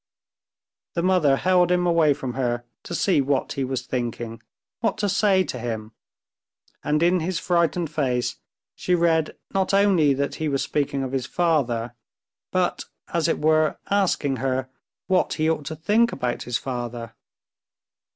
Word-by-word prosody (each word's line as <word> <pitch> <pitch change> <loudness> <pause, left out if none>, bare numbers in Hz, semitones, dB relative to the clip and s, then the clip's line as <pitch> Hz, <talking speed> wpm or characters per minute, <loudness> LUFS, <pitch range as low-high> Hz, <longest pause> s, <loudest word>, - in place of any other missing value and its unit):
The 170 - 0
mother 180 -7 +4
held 180 +3 +3
him 180 0 +2
away 165 -4 +4
from 130 -2 -5
her 120 -2 -1 0.2
to 175 - -4
see 180 -4 +3
what 135 0 0
he 135 - -2
was 130 -1 -3
thinking, 120 -2 -4 0.4
what 225 -2 0
to 210 -1 0
say 195 -1 +3
to 125 - -5
him, 110 -2 -4 0.9
and 150 +2 +1
in 180 +1 +4
his 175 +2 -2
frightened 170 -2 +1
face 130 -5 -1 0.4
she 180 - 0
read 165 -2 +1 0.2
not 195 0 +1
only 185 -8 +4
that 140 +1 -1
he 155 - 0
was 135 -1 0
speaking 140 -2 -1
of 130 - -4
his 130 -2 -2
father, 130 -10 0 0.6
but, - - 0 0.3
as 170 -1 +2
it 165 - +1
were, 155 0 +2
asking 180 -9 +1
her 130 0 -2 0.3
what 185 -1 +2
he 155 0 0
ought 160 -2 0
to 160 - -4
think 210 +9 +2
about 125 -2 -2
his 120 - +1
father. 120 -3 -5
150 Hz, 160 wpm, -24 LUFS, 130-175 Hz, 0.9 s, mother